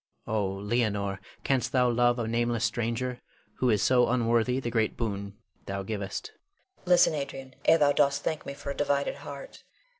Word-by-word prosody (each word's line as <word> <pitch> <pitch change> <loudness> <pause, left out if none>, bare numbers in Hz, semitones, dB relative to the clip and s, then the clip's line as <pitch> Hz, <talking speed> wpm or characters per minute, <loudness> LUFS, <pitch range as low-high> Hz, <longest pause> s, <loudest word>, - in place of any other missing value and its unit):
Oh, 105 -2 0
Leonore, 100 -1 -1 0.2
canst 130 -3 +1
thou 125 -1 +4
love 120 0 +3
a 115 -2 -2
nameless 120 0 0
stranger 120 +3 -2 0.4
who 130 - +2
is 105 -3 +2
so 125 -2 +4
unworthy 120 +1 +2
the 120 -3 -3
great 110 -2 0
boon 100 -3 -4 0.3
thou 100 0 -3
givest. 105 - -4
Leonore. 395 -2 -38
Listen, 175 -2 +5
Adrian, 135 -2 -5
ere 165 - +6
thou 145 -2 +4
dost 140 -1 +2
thank 155 - -2
me 140 - -6
for 140 - -5
a - - -5
divided 140 -1 0
heart. 140 -1 -10
120 Hz, 175 wpm, -28 LUFS, 110-140 Hz, 0.4 s, ere